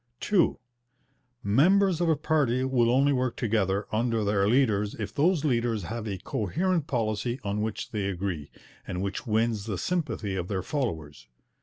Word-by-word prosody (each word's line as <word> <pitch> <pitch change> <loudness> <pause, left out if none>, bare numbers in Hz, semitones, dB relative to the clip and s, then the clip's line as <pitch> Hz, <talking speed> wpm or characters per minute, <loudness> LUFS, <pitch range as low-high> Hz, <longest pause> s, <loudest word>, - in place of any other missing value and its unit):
(2) 200 -5 +2 0.9
Members 175 - +3
of 170 - +2
a 160 - +4
party 145 -5 +1
will 125 -3 +2
only 135 +3 +4
work 130 -2 0
together 105 -4 0
under 115 0 0
their 100 -1 +2
leaders 105 -4 +2
if 105 -2 -5
those 160 - +2
leaders 115 -6 0
have 110 +5 -5
a 100 -2 -3
coherent 160 - -1
policy 115 +1 -1
on 100 +1 -2
which 110 0 -4
they 105 -3 -2
agree, 90 -6 -3 0.4
and 90 +1 -3
which 100 +5 -4
wins 110 -1 +1
the 100 -4 -2
sympathy 135 - -2
of 90 -2 -3
their 95 -3 -2
followers. 80 - -4
110 Hz, 160 wpm, -27 LUFS, 100-135 Hz, 0.9 s, a